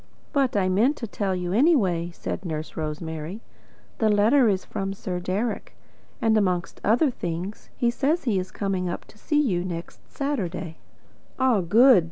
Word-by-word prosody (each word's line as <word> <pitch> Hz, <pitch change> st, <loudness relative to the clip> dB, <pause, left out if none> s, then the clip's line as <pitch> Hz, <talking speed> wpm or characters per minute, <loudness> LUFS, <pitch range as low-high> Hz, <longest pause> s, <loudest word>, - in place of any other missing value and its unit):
"But 270 Hz, -6 st, +2 dB
I 190 Hz, -2 st, +2 dB
meant 225 Hz, +11 st, +3 dB
to 235 Hz, -, -4 dB
tell 200 Hz, -3 st, -2 dB
you 180 Hz, 0 st, -2 dB
anyway," 200 Hz, -, +3 dB
said 170 Hz, -, -5 dB
Nurse 155 Hz, -3 st, -5 dB
Rosemary. 160 Hz, +4 st, -4 dB, 0.6 s
"The 220 Hz, -, +3 dB
letter 220 Hz, +5 st, +5 dB
is 190 Hz, -2 st, 0 dB
from 195 Hz, 0 st, -3 dB
Sir 180 Hz, -2 st, -4 dB
Deryck, 195 Hz, +6 st, -2 dB, 0.4 s
and, 225 Hz, -1 st, +3 dB
amongst 185 Hz, -5 st, 0 dB
other 240 Hz, +7 st, +3 dB
things, 175 Hz, 0 st, -5 dB
he 240 Hz, -2 st, +2 dB
says 295 Hz, +7 st, 0 dB
he 220 Hz, -7 st, +1 dB
is 185 Hz, 0 st, -4 dB
coming 190 Hz, -2 st, -2 dB
up -, -, -5 dB
to 215 Hz, -, -19 dB
see 295 Hz, +5 st, +1 dB
you 190 Hz, -12 st, +1 dB
next 170 Hz, -2 st, -6 dB
Saturday." 190 Hz, -, -3 dB, 0.6 s
"Ah, 255 Hz, -6 st, +3 dB
good!" 225 Hz, +6 st, +6 dB
195 Hz, 165 wpm, -25 LUFS, 180-240 Hz, 0.6 s, good